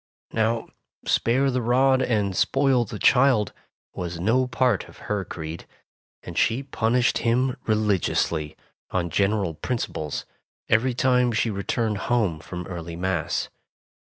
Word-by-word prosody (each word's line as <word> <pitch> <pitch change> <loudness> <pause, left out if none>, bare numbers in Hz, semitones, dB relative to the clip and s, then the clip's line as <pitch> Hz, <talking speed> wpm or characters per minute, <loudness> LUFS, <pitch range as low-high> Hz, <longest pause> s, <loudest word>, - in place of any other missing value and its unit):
Now 115 +1 0 0.4
spare 135 +4 +2
the 125 0 0
rod 130 +3 +3
and 105 -6 0
spoil 135 0 +2
the 105 - -7
child 125 -4 +4 0.4
was 85 -1 -5
no 120 +8 +2
part 125 0 +1
of - - -16
her 105 -2 -1
creed, 80 -1 -7 0.6
and - - -8
she 115 +5 +2
punished 125 -2 +1
him 125 +2 +1
religiously, 100 -7 0 0.3
on 85 -2 -1
general 100 -1 +1
principles, 80 - -3 0.4
every 120 +3 +2
time 125 -1 +3
she 115 0 0
returned 105 +1 -1
home 105 -10 +1
from 90 +2 -7
early 85 -2 -6
Mass. 90 -2 -1
110 Hz, 130 wpm, -24 LUFS, 95-125 Hz, 0.6 s, child